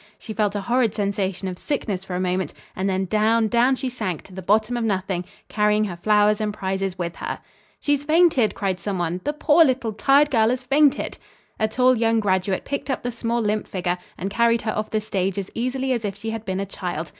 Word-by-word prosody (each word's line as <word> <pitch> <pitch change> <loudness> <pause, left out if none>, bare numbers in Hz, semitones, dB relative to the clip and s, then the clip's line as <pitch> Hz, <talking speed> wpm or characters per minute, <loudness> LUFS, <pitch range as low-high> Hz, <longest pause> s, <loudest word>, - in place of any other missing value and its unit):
She 220 - -8
felt 210 -2 0
a 205 - -1
horrid 235 +1 +1
sensation 195 -2 -1
of 180 -1 -5
sickness 210 -10 -2
for 190 -2 -5
a - - -1
moment; 185 0 -1 0.2
and 190 +1 -1
then 190 0 0
down, 220 +3 +2
down 240 +4 +3
she 260 +1 -4
sank 215 -10 -3
to 190 - -15
the 190 - -6
bottom 215 +5 +2
of 240 - -1
nothing, 190 -4 -1 0.2
carrying 210 0 +2
her 190 -5 -3
flowers 210 +3 +3
and 210 -1 0
prizes 190 -2 -3
with 170 -1 -4
her. - - -4 0.4
"She's 290 -1 +1
fainted!" 310 -7 +3
cried 190 -2 -1
some 195 +2 -3
one. 175 +1 -2
"The 295 - 0
poor, 305 +2 +5
little, 255 -6 0
tired 280 +7 +4
girl 225 -3 +4
has 250 +1 -1
fainted!" 280 +2 +2 0.4
A 220 - +2
tall 250 +3 +3
young 225 -1 +2
graduate 190 -2 0
picked 280 +1 -4
up 265 - -2
the 245 - -2
small, 235 0 -1
limp 210 0 -1
figure 180 -1 -2 0.2
and 195 +2 -4
carried 235 +1 +2
her 215 - -2
off 215 0 -2
the 215 - 0
stage 195 -3 -2
as 195 -1 -4
easily 255 +2 -1
as 235 -3 -2
if 200 -2 -3
she 220 +2 -5
had 225 -1 -5
been 190 -1 -2
a 200 - -1
child. 175 -4 -5
215 Hz, 225 wpm, -23 LUFS, 190-240 Hz, 0.4 s, poor